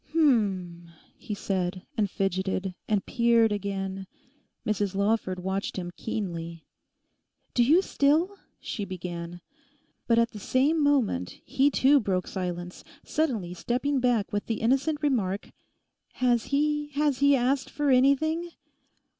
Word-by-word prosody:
'H'm!' 195 Hz, -, +1 dB, 0.3 s
he 210 Hz, -, -6 dB
said, 185 Hz, -2 st, -2 dB
and 210 Hz, -4 st, +1 dB
fidgeted, 190 Hz, 0 st, -1 dB
and 205 Hz, -3 st, 0 dB
peered 235 Hz, -2 st, +3 dB
again. 195 Hz, -1 st, -3 dB, 0.6 s
Mrs 205 Hz, -2 st, -1 dB
Lawford 200 Hz, -2 st, 0 dB
watched 190 Hz, +1 st, -2 dB
him 175 Hz, -1 st, -4 dB
keenly. 170 Hz, -6 st, -5 dB, 0.9 s
'Do 240 Hz, -, +4 dB
you 320 Hz, +10 st, +5 dB
still—' 320 Hz, +8 st, +2 dB, 0.2 s
she 210 Hz, -, -5 dB
began. 175 Hz, -2 st, -6 dB, 0.7 s
But 230 Hz, -, +3 dB
at 230 Hz, 0 st, +3 dB
the 210 Hz, -, -9 dB
same 280 Hz, +9 st, +2 dB
moment 245 Hz, -, +1 dB
he 275 Hz, +2 st, +3 dB
too 280 Hz, 0 st, +4 dB
broke 190 Hz, -6 st, -1 dB
silence, 180 Hz, -1 st, -5 dB, 0.2 s
suddenly 230 Hz, -, -1 dB
stepping 260 Hz, +8 st, -1 dB
back 245 Hz, -6 st, +1 dB
with 205 Hz, -, -2 dB
the 225 Hz, -2 st, -2 dB
innocent 275 Hz, +6 st, +1 dB
remark, 205 Hz, -9 st, 0 dB, 0.6 s
'Has 245 Hz, -3 st, +1 dB
he—has 295 Hz, -1 st, 0 dB
he 280 Hz, 0 st, +5 dB
asked 265 Hz, +1 st, 0 dB
for 290 Hz, -2 st, 0 dB
anything? 315 Hz, +6 st, +3 dB
225 Hz, 125 wpm, -27 LUFS, 190-280 Hz, 0.9 s, you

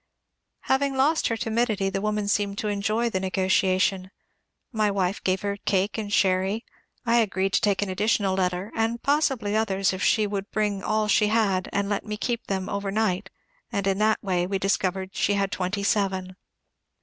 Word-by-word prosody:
Having 270 Hz, +1 st, +1 dB
lost 290 Hz, +5 st, +2 dB
her 230 Hz, -, -1 dB
timidity, 220 Hz, -3 st, 0 dB
the 195 Hz, 0 st, -2 dB
woman 210 Hz, 0 st, -1 dB
seemed 200 Hz, -1 st, 0 dB
to 210 Hz, -, -2 dB
enjoy 215 Hz, +3 st, 0 dB
the 195 Hz, -5 st, -1 dB
negotiation. 190 Hz, 0 st, +1 dB, 0.6 s
My 215 Hz, -3 st, +1 dB
wife 195 Hz, -1 st, -1 dB
gave 185 Hz, 0 st, 0 dB
her 200 Hz, 0 st, -2 dB
cake 195 Hz, 0 st, 0 dB
and 210 Hz, -2 st, -4 dB
sherry. 195 Hz, +3 st, +1 dB, 0.4 s
I 235 Hz, 0 st, +3 dB
agreed 195 Hz, -3 st, +1 dB
to -, -, +3 dB
take 205 Hz, -1 st, +2 dB
an 200 Hz, -, -4 dB
additional 200 Hz, 0 st, +1 dB
letter, 185 Hz, +1 st, -1 dB
and 225 Hz, +1 st, -1 dB
possibly 270 Hz, -8 st, +1 dB
others, 195 Hz, -3 st, +1 dB
if 185 Hz, -, -5 dB
she 215 Hz, -2 st, +3 dB
would 200 Hz, 0 st, -4 dB
bring 210 Hz, -2 st, -1 dB
all 215 Hz, +1 st, 0 dB
she 210 Hz, 0 st, +3 dB
had 210 Hz, -4 st, +1 dB
and 200 Hz, 0 st, 0 dB
let 205 Hz, -1 st, -1 dB
me 210 Hz, -1 st, -5 dB
keep 235 Hz, +1 st, -3 dB
them 190 Hz, -1 st, -2 dB
over 200 Hz, 0 st, -3 dB
night, 200 Hz, -2 st, 0 dB, 0.4 s
and 200 Hz, -4 st, -1 dB
in 195 Hz, 0 st, +1 dB
that 215 Hz, 0 st, +3 dB
way 180 Hz, -3 st, 0 dB
we 195 Hz, +1 st, -1 dB
discovered 190 Hz, 0 st, -1 dB
she 205 Hz, -, +1 dB
had 200 Hz, 0 st, 0 dB
twenty 190 Hz, +2 st, -2 dB
seven. 190 Hz, -3 st, 0 dB
200 Hz, 185 wpm, -25 LUFS, 190-215 Hz, 0.6 s, I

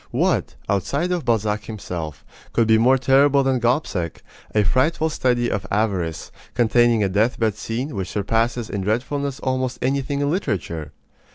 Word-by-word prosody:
What, -, -, 0 dB
outside 140 Hz, -, 0 dB
of 175 Hz, -3 st, -1 dB
Balzac 110 Hz, -2 st, 0 dB
himself, 85 Hz, -, -6 dB, 0.3 s
could 115 Hz, -2 st, +3 dB
be 110 Hz, 0 st, +5 dB
more 130 Hz, +4 st, +5 dB
terrible 140 Hz, +1 st, +4 dB
than 130 Hz, -1 st, +1 dB
Gobseck, 115 Hz, -, -1 dB, 0.3 s
a 105 Hz, -, +4 dB
frightful 155 Hz, +8 st, +1 dB
study 120 Hz, -4 st, +1 dB
of 95 Hz, -2 st, -3 dB
avarice, 95 Hz, -6 st, -1 dB, 0.2 s
containing 120 Hz, -1 st, +3 dB
a -, -, +2 dB
deathbed 110 Hz, +2 st, +1 dB
scene 115 Hz, +7 st, -4 dB
which 95 Hz, -2 st, -3 dB
surpasses 115 Hz, +3 st, 0 dB
in 100 Hz, -, -3 dB
dreadfulness 135 Hz, +7 st, -1 dB
almost 130 Hz, -1 st, -1 dB
anything 140 Hz, +2 st, -1 dB
in 145 Hz, 0 st, +1 dB
literature? 85 Hz, -, -3 dB
115 Hz, 150 wpm, -22 LUFS, 105-135 Hz, 0.3 s, be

